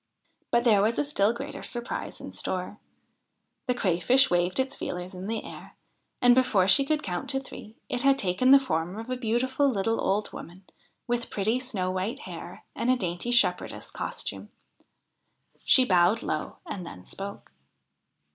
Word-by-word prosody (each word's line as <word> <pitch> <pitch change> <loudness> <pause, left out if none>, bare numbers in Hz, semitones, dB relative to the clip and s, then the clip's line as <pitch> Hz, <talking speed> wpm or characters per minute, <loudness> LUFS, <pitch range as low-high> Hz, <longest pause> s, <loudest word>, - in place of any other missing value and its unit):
But 235 0 +2
there 215 -5 +5
was 220 +3 +1
a - - +2
still 225 -8 +2
greater 275 +5 -6
surprise 240 0 -4
in - - -9
store. 185 +3 -4 0.9
The 250 - +1
Crayfish 245 +6 +3
waved 175 +4 +1
its 265 +1 0
feelers 180 +2 -5
in 185 +1 -7
the 225 +1 -3
air, - - -11 0.5
and, 245 0 +8
before 225 -7 +3
she 275 +7 +6
could 305 +1 0
count 180 +4 -3
three, 215 -2 -10
it 245 - -1
had 275 0 +4
taken 195 +3 +1
the 275 +1 +9
form 180 -7 -2
of 225 +3 -6
a - - 0
beautiful 255 +4 +1
little 225 -1 0
old 205 +2 -1
woman, 180 +3 -10 0.4
with 240 -1 -2
pretty 220 +5 0
snow 210 -8 -2
white 195 +9 -3
hair - - -9
and 235 - -1
a 255 - +5
dainty 175 +1 -2
shepherdess 240 +1 +1
costume. - - -5 1.2
She 260 - +6
bowed 185 +1 +3
low, - - -3
and 200 - -6
then 90 - -10
spoke. 200 - -8
225 Hz, 165 wpm, -27 LUFS, 185-255 Hz, 1.2 s, the